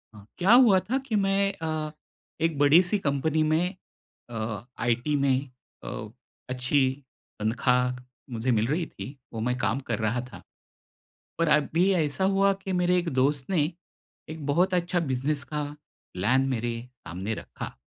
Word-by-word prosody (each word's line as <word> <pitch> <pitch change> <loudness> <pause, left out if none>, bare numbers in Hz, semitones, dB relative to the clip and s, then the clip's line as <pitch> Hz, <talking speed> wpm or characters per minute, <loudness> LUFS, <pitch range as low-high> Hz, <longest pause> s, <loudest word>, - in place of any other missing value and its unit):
अ, 100 -1 -13
क्या 190 +5 +5
हुआ 240 -6 +7
था 240 +8 -1
कि 225 - -1
मैं 195 0 +2
अ, 155 -1 -2 0.5
एक 165 -2 +1
बड़ी-सी 170 +7 +5
कंपनी 155 0 +1
में 165 +5 +1 0.5
अ, 110 -2 -4
आईटी 120 +5 +1
में 140 -2 +3 0.5
अ, - - -5 0.4
अच्छी 130 +2 +2 0.5
तनख्वाह 125 +3 +1 0.4
मुझे 120 +3 0
मिल 110 -1 +2
रही 160 +5 0
थी, 140 -2 -9 0.2
वो 115 - -4
मैं 125 +2 0
काम 115 +1 0
कर 115 - 0
रहा 110 +3 0
था। - - -10 1.0
पर 170 - +2
अभी 160 +5 +3
ऐसा 160 0 0
हुआ 195 0 +4
कि 190 - -3
मेरे 180 0 +2
एक 175 -1 0
दोस्त 135 +1 +1
ने 175 -6 +3 0.7
एक 155 -2 -6
बहुत 175 +6 +2
अच्छा 175 0 +1
बिज़नेस 140 -1 -1
का 150 0 0 0.5
प्लान 105 +9 +2
मेरे 120 -2 -1 0.3
सामने 95 +6 -4
रखा। - - -8
145 Hz, 150 wpm, -27 LUFS, 125-175 Hz, 1.0 s, हुआ